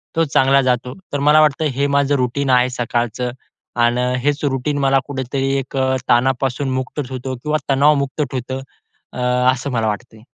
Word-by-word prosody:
तो 165 - +3
चांगला 135 -1 +3
जातो. 125 -1 0 0.2
तर 145 - 0
मला 150 +2 +5
वाटतं 155 +1 +2
हे 140 +1 +1
माझं 140 0 +2
रुटीन 130 +1 -1
आहे 125 0 +4
सकाळचं 120 0 -2 0.5
आन् 120 +1 +2 0.3
हेच 145 +1 0
रुटीन 140 +1 -1
मला 135 -1 +3
कुठेतरी 135 0 -2
एक 135 +1 -6
अ, 130 0 +1
ताणापासून 130 +2 +1
मुक्त 130 +3 -4
ठेवतो 130 0 -5
किंवा 150 +5 -1
तणावमुक्त 140 +1 +2
ठेवतं 130 +1 -4 0.5
अ, - - -7 0.3
असं 130 +2 -4
मला 115 -3 0
वाटतंय. 110 +1 -5
130 Hz, 160 wpm, -19 LUFS, 125-140 Hz, 0.5 s, मला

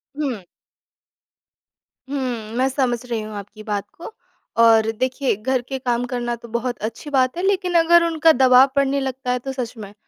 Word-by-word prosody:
हुँ। 260 -10 -3 1.7
हुँ, 245 -6 -3
मैं 260 +1 +2
समझ 255 -3 0
रही 230 -3 -3
हूँ 215 0 -8
आपकी 205 +2 -9
बात 205 -2 -3
को। 345 +6 -9 0.5
और 225 -1 +5
देखिए, 255 +2 -1
घर 255 +4 -1
के 265 +2 -5
काम 245 -1 -1
करना 240 -1 -2
तो 235 0 -13
बहुत 240 +1 -2
अच्छी 235 +6 -9
बात 260 +2 +1
है, 360 - -3
लेकिन 370 -3 0
अगर 340 +1 +5
उनका 325 -1 +4
दबाव 255 +1 +6
पड़ने 280 0 +2
लगता 260 -1 -3
है, 250 - 0
तो 270 +2 -5
सच 250 -3 -4
में 205 -1 -9
250 Hz, 180 wpm, -21 LUFS, 230-275 Hz, 1.7 s, दबाव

